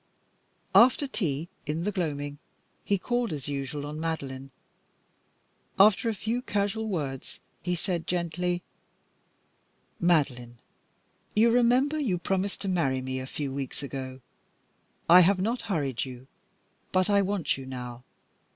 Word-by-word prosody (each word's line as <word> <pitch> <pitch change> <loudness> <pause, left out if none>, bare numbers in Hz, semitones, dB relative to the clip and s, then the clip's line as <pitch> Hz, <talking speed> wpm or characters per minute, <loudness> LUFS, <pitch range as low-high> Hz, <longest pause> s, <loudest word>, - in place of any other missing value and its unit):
After 255 +4 +6
tea, 165 - -2 0.2
in 155 +3 -1
the 210 - 0
gloaming, 145 -6 -3 0.4
he 200 - +1
called, 240 +4 -1
as 150 -3 -4
usual, 145 +1 -3
on 150 +1 -5
Madeline. 135 -5 -4 1.3
After 210 +3 +6
a 220 - -1
few 225 +5 -2
casual 210 -1 -1
words, 140 -8 -4 0.2
he 180 +1 -1
said, 175 -1 -2
gently 175 0 -1 1.4
"Madeline, 135 -9 +1 0.8
you 230 +2 +5
remember 250 +5 +3
you 220 -12 +1
promised 190 +3 -1
to 200 - -2
marry 155 -8 +1
me 130 0 -3
a 130 - -6
few 140 -1 -4
weeks 135 0 -4
ago. 130 -1 -6 0.9
I 175 +2 +9
have 185 +2 +5
not 230 +6 0
hurried 140 - 0
you, 130 -1 -8 0.7
but 185 0 +3
I 200 -1 +4
want 200 -3 0
you 135 -1 -8
now. 125 -1 -7
170 Hz, 135 wpm, -28 LUFS, 135-200 Hz, 1.4 s, I